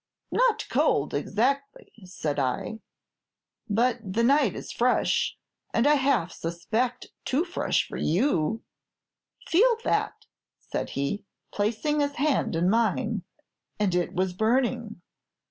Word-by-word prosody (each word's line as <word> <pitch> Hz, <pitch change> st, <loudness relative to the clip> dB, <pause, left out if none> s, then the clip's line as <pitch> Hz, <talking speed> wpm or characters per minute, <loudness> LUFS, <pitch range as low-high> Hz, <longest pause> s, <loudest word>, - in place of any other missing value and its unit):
'Not -, -, +2 dB
cold, -, -, +1 dB
exactly,' 275 Hz, +5 st, -1 dB
said 155 Hz, -5 st, -3 dB
I, 135 Hz, -, -2 dB, 0.9 s
'but 235 Hz, +4 st, +2 dB
the 205 Hz, +4 st, -1 dB
night 270 Hz, -4 st, +4 dB
is -, -, -7 dB
fresh, 245 Hz, +1 st, +1 dB, 0.4 s
and 230 Hz, -, +3 dB
I 295 Hz, -, +6 dB
half 270 Hz, -, +2 dB
suspect 220 Hz, +9 st, -2 dB
too 290 Hz, +7 st, +1 dB
fresh 350 Hz, -, 0 dB
for -, -, -6 dB
you.' 215 Hz, -, +1 dB, 0.8 s
'Feel 460 Hz, +7 st, +4 dB
that,' -, -, -1 dB, 0.3 s
said -, -, -4 dB
he, 140 Hz, +9 st, -1 dB, 0.3 s
placing 230 Hz, +9 st, 0 dB
his 285 Hz, 0 st, +1 dB
hand 285 Hz, -, +1 dB
in 170 Hz, +2 st, +2 dB
mine; 225 Hz, +3 st, +1 dB, 0.6 s
and 200 Hz, -4 st, +1 dB
it 175 Hz, -1 st, 0 dB
was 185 Hz, 0 st, 0 dB
burning. 230 Hz, 0 st, 0 dB
230 Hz, 120 wpm, -27 LUFS, 185-280 Hz, 0.9 s, I